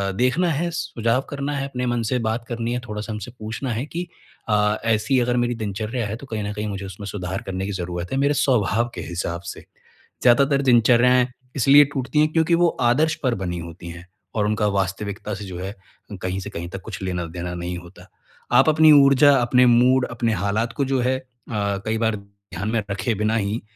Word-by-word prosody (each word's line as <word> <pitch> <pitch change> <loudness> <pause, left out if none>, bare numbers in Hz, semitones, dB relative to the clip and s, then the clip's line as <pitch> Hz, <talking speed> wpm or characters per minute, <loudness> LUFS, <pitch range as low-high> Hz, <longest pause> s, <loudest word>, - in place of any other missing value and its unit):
देखना 125 - +2
है, 165 +4 -1
सुझाव 130 -7 -1
करना 140 0 -3
है, 135 0 -2
अपने 125 -2 -3
मन 120 -1 0
से 125 - +1
बात 110 +2 -1
करनी 120 0 -3
है, 125 - -1
थोड़ा-सा 110 -2 -6
हमसे 110 +3 -6
पूछना 115 +4 -4
है 120 +6 -3
कि 175 +3 -5 0.4
अ, 105 0 +2
ऐसी 115 +4 +2
अगर 120 0 +1
मेरी 120 0 +1
दिनचर्या 110 +2 -3
है 105 - -4
तो 125 - -10
कहीं 110 -4 -3
न 100 - -3
कहीं 105 +1 -4
मुझे 100 -1 -5
उसमें 95 +2 -8
सुधार 95 -1 -4
करने 95 0 -3
की 100 - -3
जरूरत 90 -1 -4
है, 135 - -1
मेरे 140 +2 +2
स्वभाव 120 -3 +1
के - - -5
हिसाब 85 0 -4
से। - - -11 0.6
ज़्यादातार 140 +3 +4
दिनचरियाएँ 125 0 +4 0.3
इसलिए 140 +2 +7
टूटती 135 +2 -1
हैं 155 0 +3
क्योंकि 165 +1 +3
वो 175 - +6 0.2
आदर्श 155 +6 +2
पर 125 -2 +1
बनी 90 -3 -4
होती 85 +1 -9
हैं 85 +1 -10 0.3
और 105 - +1
उनका 105 0 +1
वास्तविकता 100 +2 -3
से 100 - -7
जो 90 -2 -7
है, 95 +3 -5 0.5
कहीं 95 +1 -2
से 95 - -6
कहीं 85 +1 -6
तक 95 +1 -7
कुछ 105 -2 -8
लेना-देना 90 -1 -4
नहीं 90 +1 -4
होता। 85 +1 -13 0.4
आप - - +5
अपनी 155 0 +6
ऊर्जा, 140 +1 +6
अपने 125 0 +4
मूड, 125 +2 +4
अपने 115 -1 0
हालात 105 +4 -1
को 140 - -1
जो 135 -1 0
है 130 +1 +1 0.3
अ, - - -6 0.3
कई 110 +1 0
बार 110 -1 +1
ध्यान 100 -1 -8
में 110 -3 0
रखे 100 +3 -1
बिना 110 +1 +1
ही 105 +1 -1
115 Hz, 205 wpm, -22 LUFS, 100-130 Hz, 0.6 s, इसलिए